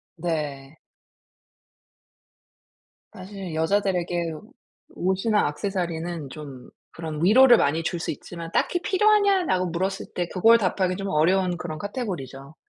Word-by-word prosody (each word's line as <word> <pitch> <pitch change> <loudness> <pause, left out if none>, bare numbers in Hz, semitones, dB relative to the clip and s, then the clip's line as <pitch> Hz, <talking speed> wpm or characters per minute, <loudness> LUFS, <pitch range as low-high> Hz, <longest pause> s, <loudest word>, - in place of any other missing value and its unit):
네. 150 -4 -4 2.4
사실 190 -2 -8
여자들에게 175 -1 0 0.6
옷이나 190 +1 +1
액세서리는 170 -2 -4
좀 140 -5 -10 0.2
그런 160 -1 -5
위로를 240 +5 +7
많이 160 0 +1
줄 175 +1 -2
수 - - -3
있지만 165 +3 -8
"딱히 350 - +1
필요하냐?"라고 390 - +3
물었을 190 +3 -3
때 175 -1 -2
그걸 225 +5 +5
답하기 185 -3 0
좀 195 0 -4
어려운 180 +3 +2
그런 160 -3 -6
카테고리죠. 155 - -6
175 Hz, 270 characters per minute, -24 LUFS, 160-200 Hz, 2.4 s, 위로를